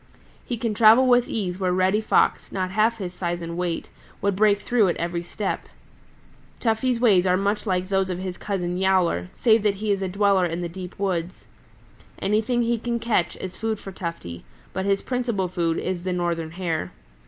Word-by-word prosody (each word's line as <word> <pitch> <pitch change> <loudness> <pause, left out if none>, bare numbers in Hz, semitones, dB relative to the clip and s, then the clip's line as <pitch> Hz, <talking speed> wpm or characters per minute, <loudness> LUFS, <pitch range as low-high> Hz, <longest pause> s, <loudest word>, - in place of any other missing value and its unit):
He 240 - -4
can 225 -1 -1
travel 225 +4 +6
with 245 -1 +4
ease 185 -4 -3
where 185 -2 +1
Reddy 185 +3 +2
Fox, 215 - +2
not 185 -1 -2
half 220 +3 +2
his 185 -4 -5
size 175 -1 -3
and 170 0 -5
weight, 175 -1 -3 0.3
would 200 -1 0
break 205 0 +4
through 230 -3 +2
at 175 - 0
every 170 0 -2
step. 190 +3 -4 0.9
Tufty's 235 +1 +1
ways 195 -7 +4
are 180 0 +3
much 205 +3 -1
like 185 -1 0
those 190 -1 +1
of 180 - -2
his 185 -1 -5
cousin, 180 -3 -2
Yowler, 185 - +2
save 225 -1 +4
that 205 -1 +1
he 210 +1 -2
is 195 -1 0
a 190 - -1
dweller 200 -1 +3
in 170 +1 -4
the 175 - -2
deep 180 +1 -8
woods. 185 -3 -2 0.7
Anything 220 +4 +1
he 235 0 0
can 240 +1 -2
catch 230 -6 0
is 185 0 -6
food 225 -1 -2
for 195 - -9
Tufty, 165 - -6 0.3
but 190 - -2
his 195 0 +1
principal 235 -7 -1
food 170 -2 -1
is 180 -2 -3
the 185 0 -1
Northern 170 -2 -1
Hare. 165 - -3
190 Hz, 195 wpm, -24 LUFS, 180-215 Hz, 0.9 s, travel